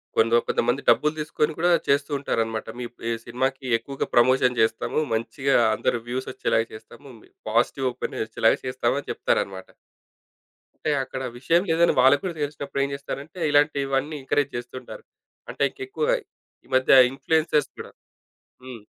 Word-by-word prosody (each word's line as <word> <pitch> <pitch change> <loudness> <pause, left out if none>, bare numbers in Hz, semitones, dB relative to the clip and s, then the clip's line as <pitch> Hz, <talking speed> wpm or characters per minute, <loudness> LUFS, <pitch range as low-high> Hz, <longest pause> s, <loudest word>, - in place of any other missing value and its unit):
కొందొ 115 +1 +4
కొంతమంది 120 +3 0
డబ్బులు 150 +1 +4
తీసుకొని 150 0 -1
కూడా 175 +2 +2 0.2
చేస్తూ 140 +2 +1
ఉంటారనమాట. 115 -5 -2
మీ 125 - -4 0.2
ఈ - - 0
సినిమాకి 130 +3 -2
ఎక్కువగా 135 +4 -5
ప్రమోషన్ 125 0 +4
చేస్తాము. 110 +6 0
మంచిగా 135 +5 0 0.2
అంద - - -14
రివ్యూసొచ్చేలాగా 120 -1 -2
చేస్తాము. 115 +5 -13
మీ - - -20 0.2
పాజిటివ్ 125 +4 +1
ఓపిన్ 125 - -5
ఒచ్చేలాగా 110 0 +2
చేస్తామని 130 +2 -1
చెప్తారనమాట. 95 -1 -2 1.2
అంటే - - +1
అక్కడ 130 0 -6 0.2
విషయం 165 +7 +2
లేదని 170 +1 +3
వాళ్ళకు 135 +2 +5
కూడా 175 -3 -3
తెలిసినప్పుడేం 140 -1 -2
చేస్తారంటే, 140 +4 -7
ఇలాంటివన్నీ 145 0 +1
ఎంకరేజ్ 145 +1 0
చేస్తూంటారు. 130 - -9 0.5
అంటే - - -2
ఇంకెక్కువగా. 440 +5 -1 0.5
ఈ - - -22
మధ్య 130 0 +4 0.2
ఇన్‌ఫ్లుయెన్సర్స్ 150 +1 +1
కూడా - - -8 0.7
హ్మ్. 125 -4 -9
135 Hz, 130 wpm, -24 LUFS, 120-145 Hz, 1.2 s, వాళ్ళకు